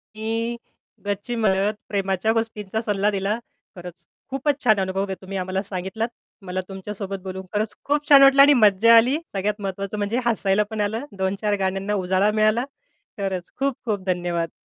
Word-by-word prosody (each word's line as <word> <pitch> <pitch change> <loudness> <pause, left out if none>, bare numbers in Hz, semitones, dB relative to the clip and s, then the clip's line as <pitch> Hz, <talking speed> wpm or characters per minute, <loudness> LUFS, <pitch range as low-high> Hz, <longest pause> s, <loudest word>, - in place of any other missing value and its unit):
की 225 +2 -2 0.5
गच्ची 205 +4 -3
मदत 205 -1 +2 0.2
प्रेमाच्या 195 +1 0
गोष्टींचा 220 -2 -2
सल्ला 205 -2 +1
दिला. 200 +2 -1 0.4
खरंच, 175 -1 -11 0.2
खूपच 275 +1 -1
छान 215 -4 +4
अनुभव 190 +1 -1
आहे 195 -1 -4
तुम्ही 190 +1 -6
आम्हाला 185 +1 -2
सांगितलात. 190 +4 -3 0.3
मला 185 0 -3
तुमच्यासोबत 195 0 -6
बोलून 190 0 -6
खरंच 210 +1 -1
खूप 295 +1 0
छान 280 -1 +9
वाटलं 275 0 +7
आणि 290 +1 +8
मज्जा 220 0 +6
आली. 250 +6 +4 0.2
सगळ्यात 205 +2 -2
महत्वाचं 195 +1 -4
म्हणजे 210 +4 -1
हसायला 210 -3 +2
पण 215 -1 -2
आलं. 220 +6 -2
2-4 195 +2 0
गाण्यांना 195 +2 -1
उजाळा 190 +2 +2
मिळाला. 220 +4 +3 0.5
खरंच 190 -3 -3
खूप-खूप 240 -7 -2
धन्यवाद. 175 -2 -1
205 Hz, 155 wpm, -23 LUFS, 190-225 Hz, 0.5 s, छान